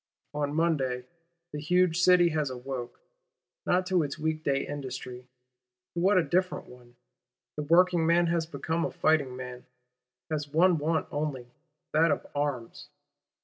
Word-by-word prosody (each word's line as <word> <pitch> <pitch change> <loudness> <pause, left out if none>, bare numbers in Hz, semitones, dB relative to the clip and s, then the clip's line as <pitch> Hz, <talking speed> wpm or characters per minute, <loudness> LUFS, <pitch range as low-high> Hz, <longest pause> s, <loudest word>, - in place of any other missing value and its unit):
On 145 0 -2
Monday 135 -7 0 0.5
the 150 - -5
huge 180 +2 +2
City 180 -1 +6
has 155 -3 -1
awoke, 125 -1 -6 0.7
not 180 +1 +2
to 185 -1 +2
its 145 -2 -3
week 155 0 -2
day 135 -2 0
industry: 130 -3 -7 0.7
to 170 - -3
what 190 +3 +4
a 180 - +4
different 185 +2 0
one! 120 -1 -16 0.6
The 150 - -3
working 170 +2 +4
man 170 +1 +4
has 170 -1 0
become 165 0 -2
a - - 0
fighting 145 -5 +1
man; 125 -1 -8 0.6
has 150 -2 -2
one 170 +2 +4
want 160 +1 0
only: 140 -5 -3 0.4
that 165 +2 +4
of 145 - -1
arms. 140 -5 -3
155 Hz, 145 wpm, -28 LUFS, 135-170 Hz, 0.7 s, City